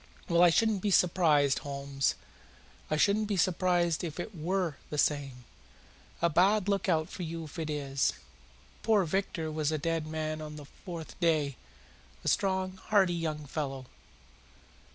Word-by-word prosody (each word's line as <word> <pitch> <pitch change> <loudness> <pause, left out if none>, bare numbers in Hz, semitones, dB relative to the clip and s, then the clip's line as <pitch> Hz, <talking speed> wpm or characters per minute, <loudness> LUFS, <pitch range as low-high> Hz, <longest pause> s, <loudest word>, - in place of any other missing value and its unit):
"Well, 170 0 +3
I 175 - +8
shouldn't 215 +3 +2
be 205 - 0
surprised, 160 -7 +4
Holmes. 140 -1 -2 0.7
I 155 - +1
shouldn't 205 +5 +3
be 205 -2 -1
surprised 175 -2 +2
if 165 -1 -5
it 190 +5 -5
WERE 175 -2 -1
the 150 - -4
same. 140 -4 0 0.8
A - - +6
bad 190 +5 +3
lookout 180 -6 +1
for - - -8
you 165 -1 -4
if 155 +2 -9
it 160 -1 -3
is. 140 -2 0 0.7
Poor 215 -3 +3
Victor 165 -2 -2
was 155 -1 0
a 155 - 0
dead 165 +1 -1
man 155 0 -3
on 150 0 -7
the 150 -1 -9
fourth 165 +2 -9
day 155 -5 +2 0.7
a - - -5
strong, 190 -1 +1
hearty 195 -4 +4
young 155 -3 -3
fellow. 135 -2 -4
165 Hz, 155 wpm, -30 LUFS, 150-185 Hz, 0.8 s, I